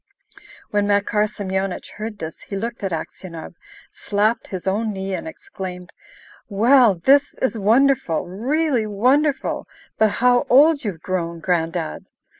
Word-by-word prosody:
When 205 -1 +1
Makar 205 +1 +2
Semyonich 190 -2 -4
heard 215 0 -5
this, 160 -3 -7
he 200 - -7
looked 230 +2 -4
at 195 - -1
Aksionov, 165 0 -7 0.4
slapped 210 +3 0
his 185 -2 -6
own 215 +3 0
knee, 195 -1 -4
and 190 - -4
exclaimed, 190 - -8 0.6
"Well, 230 +1 +5
this 275 +11 +3
is 260 - -1
wonderful! 225 - +2
Really 245 - 0
wonderful! 265 +8 +1 0.3
But 220 - +5
how 245 0 +3
old 290 +3 +5
you've 190 -7 -4
grown, 170 -2 -3
Gran'dad!" 165 - -2
205 Hz, 130 wpm, -21 LUFS, 185-250 Hz, 0.6 s, Well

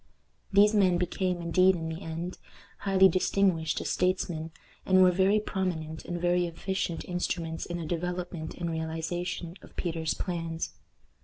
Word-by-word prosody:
These 205 +2 +6
men 190 -4 +4
became, 180 0 -1
indeed, 185 +3 +4
in 165 -1 -4
the 160 +3 -5
end, 165 +2 -5 0.4
highly 190 -1 +5
distinguished 185 -3 +1
as - - -2
statesmen, 175 -3 0 0.3
and 185 0 +5
were 180 - +6
very 190 +4 +3
prominent 175 -6 -3
and 175 0 -3
very 175 0 +2
efficient 170 0 -3
instruments 170 -2 -2
in 175 - -3
the 170 - -4
development 175 -1 -3
and 170 -1 -3
realization 165 +2 -3
of - - -16
Peter's 165 -3 -1
plans. 165 -3 -3
175 Hz, 145 wpm, -29 LUFS, 165-185 Hz, 0.4 s, These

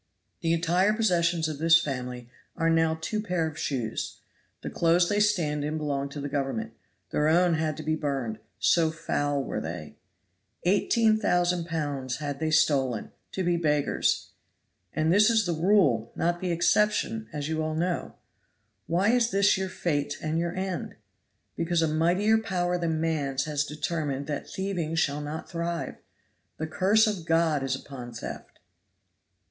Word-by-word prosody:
The 165 - +1
entire 175 +5 +2
possessions 175 -6 +2
of 155 -2 -5
this 165 +1 +6
family 125 -5 -4 0.3
are 165 0 +2
now 160 0 +2
two 215 +6 -2
pair 180 -6 -1
of 160 -2 -5
shoes. 125 -8 -3 0.5
The - - -4
clothes 170 +1 +3
they 205 - +1
stand 170 -9 +1
in 150 +2 -2
belong 140 -2 -2
to 145 0 -5
Government; 145 +11 -2 0.4
their 150 - +1
own 175 +2 +4
had 155 -2 -1
to - - -6
be 155 0 0
burned, 135 -8 -3 0.2
so 165 -2 +3
foul 145 -3 -1
were - - -3
they. - - -7 0.7
Eighteen 215 +4 +3
thousand 175 -4 +1
pounds 145 -6 -2
had 145 -1 -4
they 160 0 0
stolen 135 -7 +2 0.2
to 190 - -1
be 175 -1 +2
beggars; 150 -3 +1 0.6
and 160 +2 +1
this 210 +3 +6
is 220 -3 +3
the 175 - 0
rule, 160 - +3
not 175 +1 0
the 185 - -1
exception, 210 +5 +1
as 150 -2 -4
you 160 0 -1
all 155 0 -2
know. 175 +2 -2 0.7
Why 180 +6 +2
is 240 -1 +3
this 200 -2 +4
your 190 0 -2
fate 145 -6 -2
and 155 +1 -1
your 170 +1 -2
end? 185 -1 -3 0.6
Because 170 0 +1
a - - +3
mightier 180 +8 +3
power 180 -4 -1
than 165 -2 -1
man's 145 -5 0
has 150 -1 0
determined 150 -2 -3
that 145 -1 -4
thieving 180 -5 -3
shall 150 -2 +1
not 150 +2 -5
thrive. 170 0 -3 0.6
The 160 - -2
curse 195 +7 +3
of 195 -6 -2
God 165 -3 +2
is 135 -1 -1
upon 125 -3 -9
theft!" 115 - -8
165 Hz, 160 wpm, -27 LUFS, 145-180 Hz, 0.7 s, this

